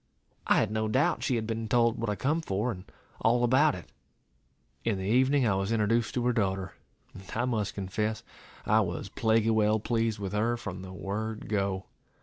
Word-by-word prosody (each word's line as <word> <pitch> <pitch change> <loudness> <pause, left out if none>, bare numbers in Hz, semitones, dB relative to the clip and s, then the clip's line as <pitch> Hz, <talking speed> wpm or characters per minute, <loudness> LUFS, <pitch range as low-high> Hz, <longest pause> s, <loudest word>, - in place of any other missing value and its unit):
I - - +5
had - - +1
no 110 0 0
doubt 130 +7 +1
she 130 - +1
had 110 -2 -1
been 115 0 -3
told 115 +1 +2
what 115 -1 -1
I 105 - 0
come 150 +9 0
for, 105 -1 -1
and 90 -3 -8 0.3
all 120 +2 +3
about 135 +5 +4
it. 90 - -11 0.9
In 110 -4 0
the 95 - -4
evening 130 +6 +3
I 105 - +3
was 95 +2 -1
introduced 115 +1 +1
to 120 -1 0
her 125 - +3
daughter, 95 -4 -1 0.4
and 95 - -10
I 120 +2 +1
must 110 -5 -1
confess, 105 +3 -2 0.4
I - - +4
was - - -2
plaguy 115 0 +2
well 110 0 +3
pleased 115 0 0
with 100 -1 -5
her 115 +3 +1
from 100 -5 -6
the 95 0 -8
word 105 +3 -4
go. 100 -2 -1
110 Hz, 195 wpm, -29 LUFS, 100-120 Hz, 0.9 s, I